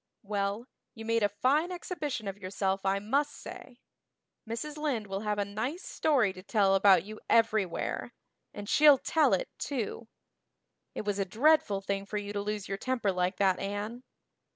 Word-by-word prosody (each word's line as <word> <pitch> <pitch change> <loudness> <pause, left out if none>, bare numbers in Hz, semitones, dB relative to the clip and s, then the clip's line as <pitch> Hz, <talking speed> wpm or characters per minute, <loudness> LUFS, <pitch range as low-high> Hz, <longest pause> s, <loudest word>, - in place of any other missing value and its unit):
"Well, 200 +2 -2 0.3
you 225 -1 -8
made 230 0 +1
a 205 - +3
fine 280 - +1
exhibition 305 - -4
of 195 +1 -5
yourself 195 0 -2
I 195 +1 +2
must 275 +9 0
say. 360 -9 -10 0.7
Mrs. 270 +7 -4
Lynde 290 -8 -1
will 195 -1 -4
have 210 0 -1
a 205 - 0
nice 245 - -4
story 255 -11 +1
to 185 - -10
tell 195 -1 +2
about 195 -3 +6
you 215 +2 -9
everywhere 215 -6 +1 0.4
and 205 0 -8
she'll 295 +3 +7
tell 315 +4 +2
it, - - -4
too. 235 -4 -3 0.9
It - - -4
was 205 -1 -1
a - - +3
dreadful 220 - +3
thing 195 0 -3
for 210 - -3
you 205 0 -4
to 205 - -1
lose 210 -1 -3
your 195 0 -4
temper 245 -5 0
like 180 +1 -1
that, 190 -2 +2
Anne." 205 +4 -4
210 Hz, 175 wpm, -30 LUFS, 195-255 Hz, 0.9 s, she'll